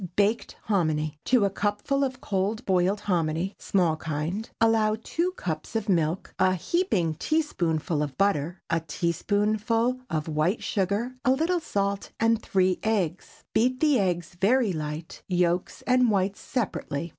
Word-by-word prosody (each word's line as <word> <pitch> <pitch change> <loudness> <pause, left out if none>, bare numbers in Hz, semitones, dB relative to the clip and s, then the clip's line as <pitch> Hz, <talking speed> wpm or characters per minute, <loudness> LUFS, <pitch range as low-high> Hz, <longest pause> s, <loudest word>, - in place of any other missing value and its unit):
BAKED 210 +3 +1
HOMINY. 155 -7 0
✠ - - -51
To 245 -5 +4
a 200 - 0
cupful 205 +8 0
of 260 -1 -3
cold 205 +4 -1
boiled 190 +2 +2
hominy 175 -1 0
(small 175 -5 +1
kind) 160 +8 -3
allow 225 -1 +3
two 350 +2 -1
cups 160 - -5
of 220 -1 -1
milk, 170 -2 0
a 185 0 +4
heaping 185 - 0
teaspoonful 170 - 0
of 145 -3 -3
butter, 180 -3 0
a 165 - +1
teaspoonful 210 +9 0
of 155 -1 -2
white 160 +7 0
sugar, 210 +6 -1
a 260 - +2
little 325 +7 +2
salt, 200 -9 -2
and 225 0 +3
three 185 -3 +1
eggs. 190 -6 -2
Beat 255 +3 +2
the 295 -4 +4
eggs 175 -2 -1
very 225 0 +3
light, 155 +1 -5
yolks 175 -1 0
and 250 -1 +4
whites 195 -1 +1
separately. 175 - -3
195 Hz, 145 wpm, -26 LUFS, 170-225 Hz, -, To